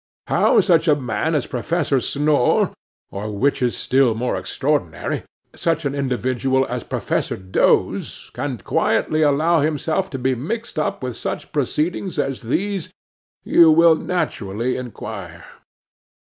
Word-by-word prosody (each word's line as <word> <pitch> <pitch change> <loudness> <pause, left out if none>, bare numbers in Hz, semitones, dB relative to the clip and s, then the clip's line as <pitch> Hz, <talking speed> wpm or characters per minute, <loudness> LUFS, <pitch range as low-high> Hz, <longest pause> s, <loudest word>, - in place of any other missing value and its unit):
How - - +4
such 170 -3 +3
a 150 - +5
man 145 +4 -1
as 145 - 0
Professor 140 +1 0
Snore, 145 -1 +2 0.4
or, 105 +2 -5
which 140 +7 +1
is 125 -1 0
still 130 -3 +2
more 125 +2 -1
extraordinary, 140 - -2 0.3
such 165 -1 -1
an 140 - 0
individual 130 -1 0
as 125 -2 -4
Professor - - -2
Doze, 95 0 0
can 130 0 -3
quietly 155 +8 0
allow 155 +3 +3
himself 155 +5 0
to 135 - -5
be 130 +1 0
mixed 175 - -4
up 150 - -2
with 125 -2 -3
such - - -5
proceedings 155 +6 -1
as 135 -2 -1
these, 190 - -2 0.5
you 170 -1 +6
will 165 +1 +6
naturally 120 - -2
inquire. 125 -4 -7
140 Hz, 135 wpm, -21 LUFS, 125-160 Hz, 0.5 s, you